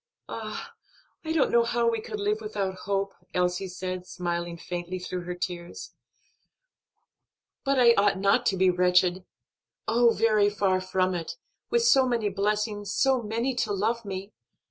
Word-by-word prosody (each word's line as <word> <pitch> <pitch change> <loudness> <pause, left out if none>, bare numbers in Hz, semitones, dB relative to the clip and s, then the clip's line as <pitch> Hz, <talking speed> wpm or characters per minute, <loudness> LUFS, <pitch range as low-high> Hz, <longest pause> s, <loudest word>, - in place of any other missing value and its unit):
"Ah, 230 - -6 0.5
I 320 - -3
don't 320 -4 +2
know 235 0 +5
how 235 0 +1
we 230 -1 +1
could 425 - -6
live 420 +2 0
without 200 - -2
hope," 195 0 -1 0.2
Elsie 180 +1 0
said, 185 0 -5
smiling 170 -1 -3
faintly 175 +1 -5
through 180 -1 -5
her 180 0 -4
tears. 175 -1 -6 1.7
"But 275 -1 +1
I 235 -1 +7
ought 200 -2 +3
not 200 +6 +2
to 195 - +1
be 185 0 +4
wretched 180 0 +2 0.6
oh, 235 +2 +4
very 215 -3 +3
far 195 -2 +1
from 185 0 0
it, 170 -2 -5 0.3
with 470 0 +2
so 270 - +5
many 230 -4 0
blessings, 205 0 -1
so 265 -2 +2
many 230 +4 -1
to 220 - 0
love 225 +4 0
me! 195 0 -6
200 Hz, 155 wpm, -27 LUFS, 185-235 Hz, 1.7 s, I